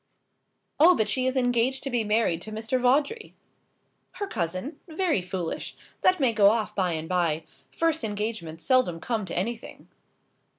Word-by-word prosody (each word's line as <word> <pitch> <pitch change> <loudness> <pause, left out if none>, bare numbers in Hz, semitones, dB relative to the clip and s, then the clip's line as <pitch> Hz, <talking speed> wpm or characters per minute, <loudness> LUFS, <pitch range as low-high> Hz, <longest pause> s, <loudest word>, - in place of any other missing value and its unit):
"Oh, 345 +4 +7
but 220 - +1
she 260 -1 0
is 260 +1 0
engaged 245 +1 +1
to 275 - -4
be 240 -2 +1
married 210 -6 +1
to 215 - -6
Mr. 225 +4 -1
Vawdrey." 290 - +1 0.8
"Her 405 - -4
cousin? 185 - -4
Very 330 - 0
foolish! 180 -2 -4 0.3
That 370 -1 +4
may 255 -5 +3
go 205 -2 +6
off 220 0 0
by 185 -3 0
and 160 0 -4
by. 165 -3 0 0.3
First 325 -3 0
engagements 205 -6 -4
seldom 255 -11 +2
come 220 +1 -2
to - - -5
anything." 225 +5 -5
225 Hz, 160 wpm, -26 LUFS, 185-265 Hz, 0.8 s, Oh